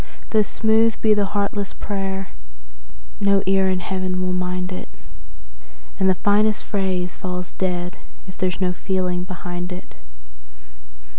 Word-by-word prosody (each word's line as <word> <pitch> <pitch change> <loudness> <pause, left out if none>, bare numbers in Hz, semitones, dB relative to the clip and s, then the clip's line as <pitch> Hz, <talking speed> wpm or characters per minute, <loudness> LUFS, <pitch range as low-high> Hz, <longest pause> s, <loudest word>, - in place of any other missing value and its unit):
Though 220 - +5
smooth 220 +2 +3
be 215 -1 +5
the 205 -1 +2
heartless 200 0 -1
prayer, 195 -2 -3 0.9
no 200 -1 +4
ear 190 0 +4
in 185 -1 +1
Heaven 185 0 -1
will 185 - 0
mind 180 0 -1
it, 185 - -5 1.1
And 190 0 +4
the 185 - +4
finest 210 +2 +3
phrase 185 -3 -1
falls 180 -1 -4
dead 180 -1 -2 0.3
if 185 - -10
there 185 -1 +1
is 180 - -5
no 180 -1 +2
feeling 180 -1 -1
behind 180 -1 -4
it. 180 +1 -7
190 Hz, 140 wpm, -23 LUFS, 180-200 Hz, 1.1 s, Though